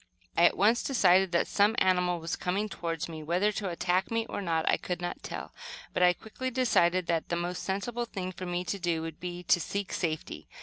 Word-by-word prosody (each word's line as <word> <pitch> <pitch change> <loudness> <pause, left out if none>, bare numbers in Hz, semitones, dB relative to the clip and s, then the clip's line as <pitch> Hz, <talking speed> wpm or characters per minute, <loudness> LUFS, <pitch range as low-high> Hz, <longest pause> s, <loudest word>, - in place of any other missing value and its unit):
I 170 - +5
at - - +4
once 220 +5 +4
decided 190 -7 +4
that 170 - +2
some 210 +2 +3
animal 180 -2 +2
was 165 +1 -3
coming 195 +4 -1
toward 165 -5 -4
me, 160 -2 -7
whether 175 +7 +1
to 200 -2 -3
attack 180 +2 0
me 230 0 0
or 205 - -5
not, 165 -3 0
I - - +4
could 180 -2 -4
not 175 0 -4
tell. - - -7 0.4
But - - 0
I 180 0 +6
quickly 240 +7 -5
decided 185 -8 +2
that 165 -1 -1
the 170 - 0
most 175 +1 -3
sensible 230 +5 -2
thing 185 -5 -5
for 185 0 -7
me 175 0 -1
to 200 +2 -3
do 170 -2 -1
would 165 -1 -6
be 175 0 -5
to 175 - +4
seek 200 +3 -3
safety. 160 -3 -3
180 Hz, 220 wpm, -29 LUFS, 170-200 Hz, 0.4 s, I